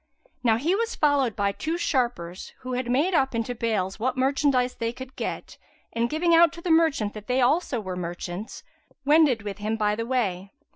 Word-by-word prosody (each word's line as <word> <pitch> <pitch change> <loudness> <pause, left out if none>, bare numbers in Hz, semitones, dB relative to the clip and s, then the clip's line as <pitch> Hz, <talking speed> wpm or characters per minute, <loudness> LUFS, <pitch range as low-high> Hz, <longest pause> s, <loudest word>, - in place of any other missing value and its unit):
Now 225 -2 +4
he 310 +9 +1
was 455 +3 -1
followed 280 -6 +2
by 200 -1 +1
two 315 +11 -3
sharpers, 240 - -2
who 255 0 -5
had 250 -1 -2
made 295 +10 +2
up 265 -6 +2
into 230 +2 -1
bales 215 -5 -2
what 255 +3 -1
merchandise 265 -1 +2
they 230 -1 -2
could 260 +2 -10
get; - - -5 0.3
and, 235 +1 0
giving 335 +2 +1
out 335 -1 +6
to 335 - -10
the 345 - -1
merchant 315 -11 +3
that 215 -1 -10
they 255 +1 +1
also 265 0 +2
were 185 -4 -5
merchants, 175 +3 -6 0.4
wended 290 -7 +4
with 205 -1 -6
him 215 +2 -1
by 210 -1 +1
the 230 +2 -3
way. 200 -7 -1
245 Hz, 195 wpm, -25 LUFS, 210-285 Hz, 0.4 s, out